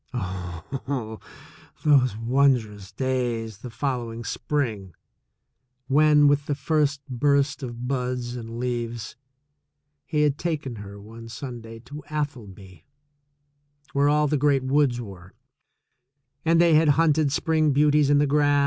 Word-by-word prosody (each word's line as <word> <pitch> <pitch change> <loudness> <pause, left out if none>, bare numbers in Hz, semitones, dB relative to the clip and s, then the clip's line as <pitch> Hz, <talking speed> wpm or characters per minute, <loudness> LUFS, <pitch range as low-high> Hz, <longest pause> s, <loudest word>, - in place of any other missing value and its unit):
Oh, 110 - -5 0.7
those 130 -7 +4
wondrous 115 -5 +1
days 120 -3 -2
the 125 - -8
following 120 -1 -3
spring, 110 - -3 0.9
when, 150 +1 +5
with 145 0 +2
the 145 - 0
first 145 -1 0
burst 140 +2 +1
of 120 -1 -6
buds 125 -2 -2
and 115 -1 -7
leaves, 120 -2 -3 0.9
he 150 -2 +1
had 145 -1 +1
taken 150 -8 -3
her 100 0 -9
one 115 +3 -11
Sunday 115 -2 -8
to 145 +5 -9
Atholby, 110 - -6 1.1
where 140 +1 +3
all 150 +1 +3
the 150 0 +1
great 140 -2 +2
woods 130 -2 +2
were, 95 -5 -10 1.1
and 165 0 +3
they 170 -1 +5
had 155 +1 +5
hunted 155 -3 +3
spring 155 +1 +1
beauties 145 0 +3
in 145 - +5
the 145 - +4
grass. 145 0 +3
130 Hz, 125 wpm, -25 LUFS, 115-145 Hz, 1.1 s, when